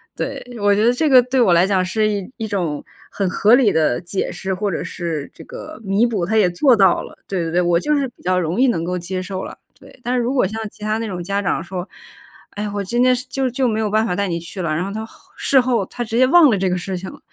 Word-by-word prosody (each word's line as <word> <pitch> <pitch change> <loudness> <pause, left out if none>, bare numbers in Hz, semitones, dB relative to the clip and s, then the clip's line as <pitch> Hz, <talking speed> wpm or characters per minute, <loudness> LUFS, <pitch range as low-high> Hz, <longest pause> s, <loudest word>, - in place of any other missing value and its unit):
对， - - -4 0.2
我 205 0 +4
觉 210 +2 +2
得 240 - +5
这 310 +5 0
个 255 -2 +8
对 250 +1 -1
我 195 -8 +5
来 175 +3 +4
讲 190 -2 +2
是 215 +3 +1
一 200 +1 -3
一 225 - -4
种 175 -8 -2 0.3
很 195 -3 -1
合 210 +5 +3
理 250 -6 +4
的 155 -4 +1
解 180 +2 -3
释， 190 0 -4
或 200 +1 -2
者 - - -3
是 165 -5 -4
这 - - -12
个 485 - -10
弥 200 +4 +2
补， 205 -7 -1
他 220 +5 0
也 190 -4 +4
做 245 +9 +4
到 195 -4 +4
了。 - - -12
对 190 -3 -2
对 165 - -3
对， 180 +1 +2
我 175 -1 +2
就 300 +7 0
是 275 -2 0
比 - - -25
较 185 0 +1
容 175 +6 -2
易 265 - +5
能 165 -8 -1
够 180 +1 -2
接 185 +1 -4
受 190 0 -5
了。 - - -9 0.2
对。 - - -17
但 245 +2 -1
是 245 - +1
如 245 +3 -1
果 250 -8 +2
像 220 +3 -5
其 - - -22
他 215 0 0
那 225 - -3
种 180 -3 -5
家 200 +2 -1
长 180 -3 -1
说： 180 +1 -6 0.6
“唉， 210 +1 -4
我 200 -1 -2
今 240 +5 -1
天 255 0 +4
是 250 - -5
就 270 -1 -1
就 255 +1 0
没 220 -1 0
有 215 -1 0
办 220 +1 +2
法 180 - -1
带 200 0 -1
你 170 -1 -2
去 175 +3 -7
了。” 155 -3 -1
然 165 - -1
后 195 - -4
他 220 +1 -5
后 - - -18 0.2
事 270 - +3
后 240 -6 0
他 240 - -5
直 230 0 -3
接 255 - +6
忘 320 -1 +7
了 210 - +2
这 190 0 0
个 180 - 0
事 185 +1 -4
情 185 +1 -7
了， - - -14
200 Hz, 315 characters per minute, -20 LUFS, 180-235 Hz, 0.6 s, 个